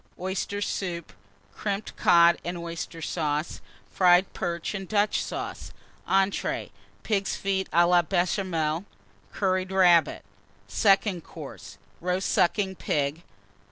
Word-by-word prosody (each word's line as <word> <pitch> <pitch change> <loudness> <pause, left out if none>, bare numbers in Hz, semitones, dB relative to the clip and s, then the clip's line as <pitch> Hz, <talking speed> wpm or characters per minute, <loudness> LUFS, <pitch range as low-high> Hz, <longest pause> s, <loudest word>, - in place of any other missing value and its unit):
Oyster 195 +2 -2
Soup. 175 -4 -4 0.4
Crimped 205 0 -4
Cod 170 -1 +5
and 175 +1 -4
Oyster 170 -1 -6
Sauce. 150 -1 -2 0.3
Fried 180 0 +4
Perch 170 +2 -3
and 195 -2 -5
Dutch 205 -1 +1
Sauce. - - -6 0.4
ENTREES. 195 +1 0 0.3
Pigs' 200 -3 0
Feet 190 -1 -1
à 170 +1 +4
la 175 0 +5
Béchamel. 175 -2 -1 0.5
Curried 185 -1 0
Rabbit. 180 -3 +4 0.4
SECOND 195 -4 +2
COURSE. - - -10 0.2
Roast 180 +2 -1
Sucking 190 +2 +2
Pig. 145 +2 -1
180 Hz, 110 wpm, -26 LUFS, 170-195 Hz, 0.5 s, Cod